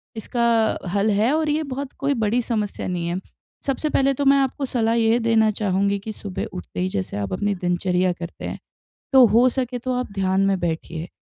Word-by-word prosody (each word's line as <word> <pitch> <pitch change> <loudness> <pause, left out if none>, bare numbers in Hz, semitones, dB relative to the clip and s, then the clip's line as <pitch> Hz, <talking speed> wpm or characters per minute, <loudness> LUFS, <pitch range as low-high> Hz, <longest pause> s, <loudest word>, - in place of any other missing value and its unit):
इसका 230 -1 +1 0.2
हल 205 +2 +2
है 215 +5 +2
और 315 -1 0
ये 310 +2 +1
बहुत 275 -1 -5
कोई 280 +1 +1
बड़ी 230 0 +1
समस्या 215 -5 -3
नहीं 175 -2 -2
है। 175 +2 -2 0.5
सबसे 280 +3 -1
पहले 275 -1 +2
तो 280 +2 -2
मैं 275 0 +6
आपको 275 +1 0
सलाह 230 -3 +1
यह 230 0 +3
देना 220 -1 +4
चाहूँगी 200 -1 0
कि 215 +2 -6
सुबह 200 -2 -5
उठते 180 - -7
ही 185 - +1
जैसे 190 - -3
आप 100 -2 -3
अपनी 205 - 0
दिनचर्या 180 0 +1
करते 170 0 -8
हैं, - - -5 0.5
तो 260 -2 +8
हो 235 +4 +5
सके 250 -1 -2
तो 255 +2 -3
आप 250 -5 -4
ध्यान 195 0 +1
में 195 -1 +2
बैठिए, 165 0 -3
220 Hz, 205 wpm, -22 LUFS, 185-250 Hz, 0.5 s, तो